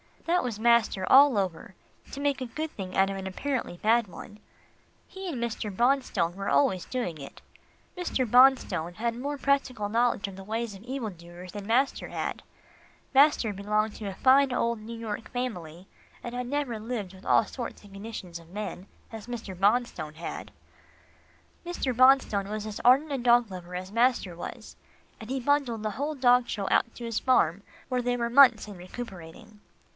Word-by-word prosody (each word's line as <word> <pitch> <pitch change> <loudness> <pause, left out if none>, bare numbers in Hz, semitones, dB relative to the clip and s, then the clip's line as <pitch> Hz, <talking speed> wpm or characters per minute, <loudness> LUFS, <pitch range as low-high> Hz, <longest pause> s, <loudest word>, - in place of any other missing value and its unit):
That 350 +2 +2
was 230 -4 -4
master 235 -4 +3
all 275 -3 +7
over 185 -1 -3 0.4
to 275 - -7
make 285 -1 0
a - - -2
good 310 +6 -5
thing 185 -2 -7
out 195 0 +4
of 195 - -4
an 190 0 -5
apparently 240 -1 -3
bad 225 +3 +2
one. 205 +3 -11 0.7
He 385 0 -8
and 320 -7 -4
Mr. 215 -3 -4
Bonstone 240 -8 +1
were 195 0 -3
always 155 +6 +2
doing 180 -12 -4
it. 140 - -11 0.6
Mr. 335 -7 -1
Bonstone 245 -9 +4
had 235 +3 -1
more 280 +5 -4
practical 270 -6 0
knowledge 230 -2 +1
of 195 -1 -9
the 195 - -9
ways 225 +2 -3
of 195 - -12
evil 250 -3 -4
doers 175 +1 -12
than 205 -1 -7
master 260 +5 +1
had. - - -4 0.7
Master 275 -6 +4
belonged 210 +2 -1
to 210 - -6
a 195 - -5
fine 270 +4 +4
old 235 -2 0
New 230 +2 -8
York 225 -1 -5
family, 185 -9 -5 0.4
and 240 - -6
had 250 0 -3
never 270 -4 -2
lived 215 -4 -5
with 190 +1 -15
all - - +4
sorts 240 -4 -7
and 200 -1 -15
conditions 195 -4 -7
of 165 0 -17
men, 200 -1 -6 0.2
as 225 -1 -9
Mr. 235 -5 -6
Bonstone 195 -6 0
had. 165 +1 -7 1.1
Mr. 345 -8 -2
Bonstone 255 -6 +4
was 215 0 -4
as 215 -1 -6
ardent 270 +5 +5
a 275 - 0
dog 240 -3 +4
lover 180 -1 -8
as 185 +1 -6
master 230 -6 +1
was, 170 - -8 0.4
and 220 - -10
he 265 +1 -1
bundled 255 -4 0
the 215 - -1
whole 290 +7 -3
dog 250 -2 +4
show 200 -2 -3
out 230 - +2
to 240 - -7
his 230 -2 -1
farm, 200 -8 +2 0.3
where 250 -1 0
they 245 0 0
were 235 -1 -2
months 245 -5 +6
in 205 -3 -9
recuperating. 195 +1 -10
225 Hz, 180 wpm, -27 LUFS, 195-255 Hz, 1.1 s, all